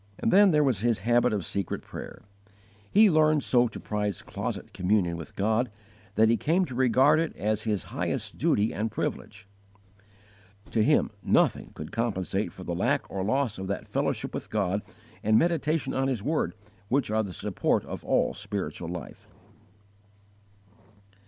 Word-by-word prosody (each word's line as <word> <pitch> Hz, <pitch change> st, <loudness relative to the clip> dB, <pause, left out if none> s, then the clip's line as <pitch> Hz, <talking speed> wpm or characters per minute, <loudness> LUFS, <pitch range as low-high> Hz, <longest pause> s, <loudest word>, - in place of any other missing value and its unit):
His 115 Hz, -1 st, +1 dB
habit 120 Hz, +1 st, +3 dB
of 100 Hz, -5 st, -2 dB
secret 100 Hz, -3 st, -3 dB
prayer. -, -, -9 dB, 0.7 s
He 215 Hz, +2 st, +6 dB
learned 155 Hz, -4 st, +4 dB
so 125 Hz, -1 st, +3 dB
to 110 Hz, -, -8 dB
prize 105 Hz, -3 st, -3 dB
closet -, -, -5 dB
communion 90 Hz, -2 st, +1 dB
with 80 Hz, -3 st, -9 dB
God 110 Hz, +5 st, +1 dB, 0.5 s
that 110 Hz, -, +5 dB
he 115 Hz, +1 st, +3 dB
came 175 Hz, +5 st, +2 dB
to 130 Hz, -, -8 dB
regard 130 Hz, +4 st, +4 dB
it 165 Hz, -1 st, -2 dB
as 110 Hz, +1 st, -1 dB
his 105 Hz, -6 st, 0 dB
highest -, -, -3 dB
duty 105 Hz, +2 st, +2 dB
and 110 Hz, +2 st, -1 dB
privilege. 105 Hz, -1 st, -4 dB, 1.2 s
To 110 Hz, -, +2 dB
him -, -, +3 dB
nothing -, -, +2 dB
could 75 Hz, -, -7 dB
compensate 100 Hz, -5 st, -1 dB
for 95 Hz, -, -10 dB
the 90 Hz, -, -3 dB
lack 125 Hz, +11 st, 0 dB
or 95 Hz, -, -2 dB
loss 115 Hz, 0 st, 0 dB
of 95 Hz, -, -4 dB
that 100 Hz, -, -4 dB
fellowship -, -, -2 dB
with -, -, -5 dB
God 100 Hz, -1 st, 0 dB, 0.4 s
and 110 Hz, +1 st, +4 dB
meditation 160 Hz, -3 st, +1 dB
on 135 Hz, 0 st, +1 dB
His 125 Hz, -7 st, -2 dB
word 155 Hz, -3 st, 0 dB, 0.3 s
which 130 Hz, 0 st, +1 dB
are 110 Hz, 0 st, +2 dB
the 100 Hz, -3 st, -5 dB
support -, -, -1 dB
of -, -, -7 dB
all -, -, +1 dB
spiritual 100 Hz, -4 st, -5 dB
life. 85 Hz, -5 st, -8 dB
110 Hz, 150 wpm, -27 LUFS, 100-130 Hz, 1.2 s, He